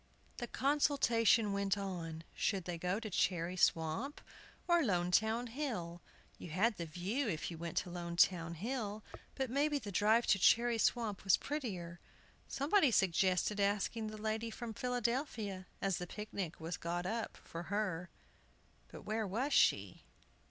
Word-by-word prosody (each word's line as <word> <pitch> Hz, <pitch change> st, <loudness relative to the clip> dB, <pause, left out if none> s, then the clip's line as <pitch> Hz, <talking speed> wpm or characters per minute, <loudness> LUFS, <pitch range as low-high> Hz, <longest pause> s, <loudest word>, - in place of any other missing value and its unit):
The 240 Hz, -, -4 dB
consultation 235 Hz, -6 st, +3 dB
went 200 Hz, 0 st, 0 dB
on. 170 Hz, -5 st, -5 dB
Should 195 Hz, -4 st, -1 dB
they 175 Hz, -2 st, -4 dB
go 180 Hz, +4 st, 0 dB
to 220 Hz, -2 st, -6 dB
Cherry 175 Hz, -1 st, 0 dB
Swamp, 165 Hz, -, +1 dB, 0.5 s
or 345 Hz, -1 st, +5 dB
Lonetown 220 Hz, -, +1 dB
Hill? 220 Hz, -, -4 dB, 0.4 s
You -, -, -8 dB
had 205 Hz, +7 st, +1 dB
the 170 Hz, -1 st, -4 dB
view 195 Hz, -, -2 dB
if 160 Hz, -1 st, -3 dB
you 165 Hz, -, -8 dB
went 170 Hz, -1 st, -5 dB
to 175 Hz, -, -1 dB
Lonetown 170 Hz, -1 st, +1 dB
Hill, 215 Hz, -, -3 dB, 0.3 s
but 265 Hz, -3 st, -2 dB
maybe 290 Hz, +2 st, +2 dB
the 210 Hz, -7 st, -6 dB
drive 215 Hz, +5 st, +3 dB
to 195 Hz, -, -1 dB
Cherry 235 Hz, +4 st, +4 dB
Swamp 220 Hz, -4 st, +1 dB
was 195 Hz, -2 st, +5 dB
prettier. 185 Hz, -, -4 dB, 0.5 s
Somebody 295 Hz, +3 st, +3 dB
suggested 190 Hz, 0 st, +2 dB
asking 205 Hz, +2 st, 0 dB
the 215 Hz, 0 st, -6 dB
lady 220 Hz, +1 st, -2 dB
from 225 Hz, 0 st, -6 dB
Philadelphia, 235 Hz, -5 st, -2 dB, 0.2 s
as 195 Hz, -2 st, +1 dB
the 180 Hz, -, -5 dB
picnic 200 Hz, -4 st, -5 dB
was 165 Hz, +2 st, -4 dB
got 175 Hz, +1 st, -3 dB
up 225 Hz, +4 st, -3 dB
for 165 Hz, -, -8 dB
her. 185 Hz, -4 st, -1 dB, 0.8 s
But -, -, -11 dB
where 215 Hz, 0 st, -1 dB
was 250 Hz, +10 st, -1 dB
she? -, -, +3 dB
205 Hz, 150 wpm, -35 LUFS, 175-235 Hz, 0.8 s, or